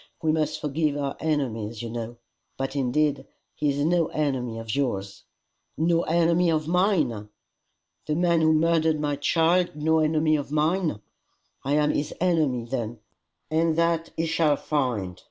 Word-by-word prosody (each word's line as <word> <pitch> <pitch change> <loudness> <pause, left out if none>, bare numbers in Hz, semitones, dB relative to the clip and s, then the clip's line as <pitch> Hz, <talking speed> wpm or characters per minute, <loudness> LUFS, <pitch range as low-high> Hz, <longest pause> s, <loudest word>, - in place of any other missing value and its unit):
We 160 - +3
must 155 0 -1
forgive 150 0 -1
our 140 -1 -2
enemies, 120 -8 -2
you 115 - -5
know. 115 0 -5 0.4
But 135 +1 -3
indeed 140 +1 0 0.3
he 150 - -1
is 140 +1 0
no 170 -1 +2
enemy 130 -6 -2
of 115 -1 -4
yours." 100 -8 -3 0.5
"No 165 +1 +2
enemy 170 +1 +2
of 155 -1 0
mine! 165 - +1 0.8
The 150 - 0
man 170 -1 +2
who 160 0 +4
murdered 160 0 +2
my 145 -1 -1
child 165 +4 +2
no 160 +1 +2
enemy 155 0 +2
of 145 -1 -6
mine! 155 - 0 0.6
I 140 - -1
am 150 0 +3
his 145 - -2
enemy 155 -9 +1
then, 120 -2 -4 0.5
and 160 0 +2
that 170 0 +1
he 165 - 0
shall 160 -2 +2
find. 120 - -2
150 Hz, 155 wpm, -25 LUFS, 135-165 Hz, 0.8 s, who